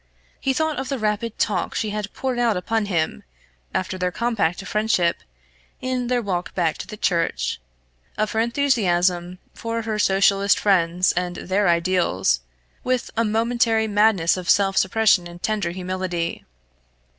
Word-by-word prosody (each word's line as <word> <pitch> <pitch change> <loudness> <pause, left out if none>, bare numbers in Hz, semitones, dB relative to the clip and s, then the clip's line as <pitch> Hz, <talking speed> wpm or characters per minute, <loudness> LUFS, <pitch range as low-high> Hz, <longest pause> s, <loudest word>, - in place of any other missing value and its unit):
He 270 - 0
thought 315 +2 0
of 265 - -4
the 275 - -1
rapid 215 0 -2
talk 185 -5 -1
she 215 - -1
had 210 -1 -4
poured 260 -2 -3
out 230 -5 +2
upon 220 +3 -1
him, 160 - -1 0.5
after 185 0 -2
their 180 0 0
compact 210 -7 0
of - - -9
friendship, 210 -5 +1 0.6
in 255 -1 -2
their 245 -1 0
walk 180 -3 -3
back 165 -4 0
to - - -6
the 215 - -8
church, 60 - 0 0.6
of 215 0 0
her 220 - -1
enthusiasm 185 -8 +1 0.2
for 230 0 -4
her 215 -1 -2
Socialist 195 0 +3
friends 180 -2 +2
and 175 0 -2
their 195 +3 0
ideals, 170 - +2 0.4
with 255 -1 -1
a 230 - +2
momentary 225 0 +1
madness 205 -5 +3
of 185 0 -5
self 195 -1 +4
suppression 200 -3 +3
and 175 +1 -12
tender 210 -5 0
humility. 180 -1 -3
200 Hz, 155 wpm, -22 LUFS, 180-225 Hz, 0.6 s, self